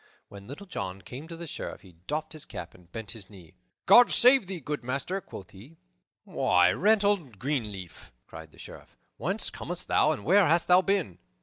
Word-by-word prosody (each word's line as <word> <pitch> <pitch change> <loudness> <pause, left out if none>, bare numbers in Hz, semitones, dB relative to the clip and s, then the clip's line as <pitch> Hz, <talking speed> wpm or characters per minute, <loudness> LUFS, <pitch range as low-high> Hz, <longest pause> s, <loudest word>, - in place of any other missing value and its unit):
When 100 0 -12
Little 145 +10 -9
John 95 - -6
came 130 - -9
to 165 -1 -9
the 170 - -7
Sheriff 155 - -7
he 95 - -16 0.2
doffed 155 +2 -3
his 155 - -9
cap - - -8
and 90 -1 -21
bent 110 -2 -6
his 100 -4 -11
knee. 90 -6 -15 0.3
"God 245 0 +8
save 250 -4 +6
thee, 190 -2 -5
good 150 -1 -5
master," 140 +10 -3
quoth 95 - -11
he. 125 +12 -15 0.5
"Why, 90 0 +3
Reynold 200 - +1
Greenleaf!" 105 - -5
cried 80 -1 -12
the - - -21
Sheriff, - - -13 0.2
"whence - - -3
comest - - -5
thou - - +3
and 100 - -5
where 190 +4 +5
hast 170 +2 +2
thou 180 +1 +7
been?" 190 - -1
140 Hz, 190 wpm, -28 LUFS, -, 0.5 s, God